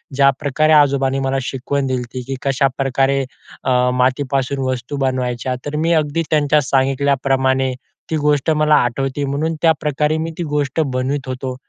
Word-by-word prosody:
ज्याप्रकारे 140 Hz, +2 st, +2 dB
आजोबांनी 135 Hz, -2 st, +3 dB
मला 135 Hz, 0 st, -1 dB
शिकवण 135 Hz, +1 st, -2 dB
दिली 130 Hz, -1 st, -1 dB
ती 130 Hz, -, -4 dB
की 135 Hz, -, -3 dB
कशाप्रकारे 135 Hz, 0 st, +1 dB, 0.4 s
अ, 125 Hz, -1 st, +2 dB
मातीपासून 130 Hz, +1 st, 0 dB
वस्तू 130 Hz, +2 st, -4 dB
बनवायच्या, 130 Hz, -2 st, -1 dB
तर 145 Hz, +1 st, -4 dB
मी 165 Hz, +3 st, +1 dB
अगदी 155 Hz, +1 st, +1 dB
त्यांच्या 150 Hz, 0 st, +3 dB
सांगितल्याप्रमाणे 135 Hz, -1 st, +1 dB, 0.4 s
ती 160 Hz, -, -1 dB
गोष्ट 150 Hz, 0 st, +1 dB
मला 155 Hz, 0 st, +3 dB
आठवते, 135 Hz, +3 st, 0 dB
म्हणून 145 Hz, +4 st, -1 dB
त्याप्रकारे 150 Hz, -2 st, +1 dB
मी 165 Hz, +1 st, -3 dB
ती 175 Hz, -, -2 dB
गोष्ट 145 Hz, -2 st, -2 dB
बनवत 135 Hz, +2 st, -2 dB
होतो. 130 Hz, 0 st, -4 dB
135 Hz, 145 wpm, -18 LUFS, 130-150 Hz, 0.4 s, आजोबांनी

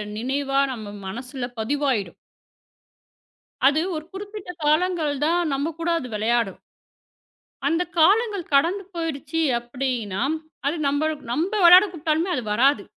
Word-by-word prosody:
நினைவா 275 Hz, +4 st, -1 dB
நம்ம 215 Hz, -3 st, -8 dB, 0.2 s
மனசுல 250 Hz, +4 st, -5 dB
பதிவாயிடும். 245 Hz, -, -1 dB, 1.5 s
அது 300 Hz, +3 st, +3 dB
ஒரு 310 Hz, -, -4 dB
குறிப்பிட்ட 405 Hz, -1 st, -8 dB, 0.2 s
காலங்கள் 315 Hz, -1 st, +2 dB
தான். 340 Hz, +3 st, +2 dB
நம்ம 285 Hz, +4 st, -1 dB
கூட 335 Hz, +1 st, -1 dB
அது 255 Hz, -, -6 dB
விளையாடும். 225 Hz, -1 st, 0 dB, 1.1 s
அந்தக் 355 Hz, +2 st, -1 dB
காலங்கள் 405 Hz, +1 st, +3 dB
கடந்து 345 Hz, +8 st, +2 dB
போயிடுச்சு 325 Hz, -1 st, -3 dB, 0.2 s
அப்படின்னா? 240 Hz, -4 st, -3 dB, 0.4 s
அது 300 Hz, -, 0 dB
நம்ப 285 Hz, +2 st, +1 dB, 0.3 s
நம்ப 335 Hz, -, -1 dB
விளையாடக் 360 Hz, +3 st, +8 dB
கூப்பிட்டாலுமே 325 Hz, +2 st, 0 dB
அது 250 Hz, -, -3 dB
வராது. 245 Hz, -1 st, +3 dB
290 Hz, 115 wpm, -23 LUFS, 250-345 Hz, 1.5 s, விளையாடக்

